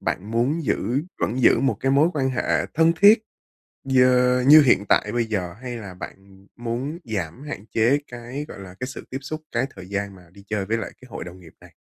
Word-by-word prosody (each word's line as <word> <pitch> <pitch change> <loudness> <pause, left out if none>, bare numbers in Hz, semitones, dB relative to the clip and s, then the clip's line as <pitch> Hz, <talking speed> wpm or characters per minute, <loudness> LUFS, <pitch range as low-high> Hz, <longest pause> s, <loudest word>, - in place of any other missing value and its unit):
bạn 105 +4 -3
muốn 135 +8 0
giữ 125 +3 0 0.2
vẫn 125 +4 -1
giữ 115 - +5
một 135 0 +1
cái 135 0 +1
mối 145 +4 +4
quan 135 -3 0
hệ 125 - 0
thân 165 +1 +4
thiết 210 +2 +7 0.6
dơ 125 -1 +4
như 155 +2 +10
hiện 120 -7 +3
tại 105 - +3
bây 120 0 0
giờ, 95 -6 -3
hay 125 -2 -5
là 100 -5 -8
bạn 95 +1 -12
muốn 120 +8 -4
giảm 105 - -5
hạn 145 -9 -7
chế 120 +6 +3
cái, 120 +4 -7
gọi - - -10
là, 95 -2 -10
cái 125 - -3
sự 130 - -8
tiếp 135 - -4
xúc, 155 +3 -6
cái 120 +2 0
thời 90 - -10
gian 100 -1 -3
mà 90 - -16
đi 100 +1 -16
chơi 105 -2 -2
với 110 +3 0
lại 110 - -5
cái 130 - -14
hội - - -6
đồng 90 +2 -11
nghiệp 85 -3 -16
này? - - -16
120 Hz, 225 wpm, -23 LUFS, 100-135 Hz, 0.6 s, như